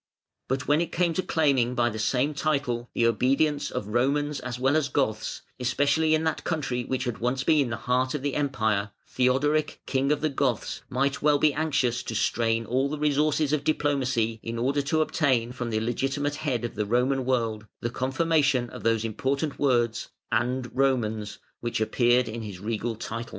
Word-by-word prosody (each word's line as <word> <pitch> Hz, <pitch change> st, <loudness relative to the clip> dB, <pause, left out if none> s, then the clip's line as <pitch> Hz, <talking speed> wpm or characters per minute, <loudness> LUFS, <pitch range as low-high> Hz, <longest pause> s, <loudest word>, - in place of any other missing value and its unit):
But 135 Hz, +1 st, -2 dB
when 150 Hz, +2 st, +3 dB
it 170 Hz, -, -2 dB
came 170 Hz, -1 st, +1 dB
to 185 Hz, -, 0 dB
claiming 135 Hz, -8 st, +1 dB
by 120 Hz, -1 st, +2 dB
the 110 Hz, -, -6 dB
same 130 Hz, +6 st, +1 dB
title 140 Hz, -5 st, -1 dB
the 115 Hz, -, +2 dB
obedience 135 Hz, +6 st, +2 dB
of 105 Hz, -, -4 dB
Romans 140 Hz, +5 st, +1 dB
as 125 Hz, -1 st, -5 dB
well 135 Hz, +3 st, +2 dB
as 155 Hz, -3 st, +1 dB
Goths, 110 Hz, -6 st, -1 dB, 0.2 s
especially 150 Hz, +5 st, +2 dB
in 155 Hz, -, 0 dB
that 160 Hz, -2 st, -1 dB
country 135 Hz, -7 st, -2 dB
which 130 Hz, +1 st, -2 dB
had 120 Hz, -3 st, -3 dB
once 125 Hz, +2 st, 0 dB
been 145 Hz, -4 st, +3 dB
the 110 Hz, -, -2 dB
heart 125 Hz, +4 st, 0 dB
of 140 Hz, -, -4 dB
the 145 Hz, -1 st, -1 dB
Empire, 110 Hz, -8 st, 0 dB, 0.2 s
Theodoric, 145 Hz, +4 st, +1 dB
King 135 Hz, +1 st, +1 dB
of 150 Hz, -1 st, +1 dB
the 155 Hz, -, +1 dB
Goths, 135 Hz, -5 st, -1 dB
might 135 Hz, +2 st, 0 dB
well 150 Hz, 0 st, +4 dB
be 150 Hz, 0 st, +3 dB
anxious 140 Hz, -6 st, 0 dB
to 110 Hz, -, -5 dB
strain 115 Hz, +1 st, +1 dB
all 130 Hz, +5 st, 0 dB
the 150 Hz, -, -3 dB
resources 150 Hz, 0 st, +1 dB
of 150 Hz, -2 st, +1 dB
diplomacy 130 Hz, -7 st, 0 dB
in 115 Hz, 0 st, -5 dB
order 135 Hz, +5 st, +1 dB
to 155 Hz, +3 st, +1 dB
obtain 130 Hz, -7 st, +1 dB
from 125 Hz, -1 st, -4 dB
the 110 Hz, -1 st, 0 dB
legitimate 135 Hz, +5 st, -1 dB
head 130 Hz, -7 st, -1 dB
of 120 Hz, -, -5 dB
the 105 Hz, -1 st, -2 dB
Roman 130 Hz, +4 st, +1 dB
world 115 Hz, -4 st, -1 dB
the 120 Hz, -, -2 dB
confirmation 135 Hz, -1 st, +1 dB
of -, -, -8 dB
those 115 Hz, -1 st, +1 dB
important 135 Hz, +7 st, -2 dB
words 120 Hz, -4 st, +1 dB, 0.2 s
"and 125 Hz, +2 st, -1 dB
Romans", 110 Hz, -6 st, 0 dB, 0.2 s
which 120 Hz, -1 st, -2 dB
appeared 120 Hz, +2 st, +3 dB
in 115 Hz, +1 st, -5 dB
his 100 Hz, -4 st, -7 dB
regal 115 Hz, +3 st, -2 dB
title. 115 Hz, +1 st, -5 dB
130 Hz, 185 wpm, -26 LUFS, 115-145 Hz, 0.2 s, well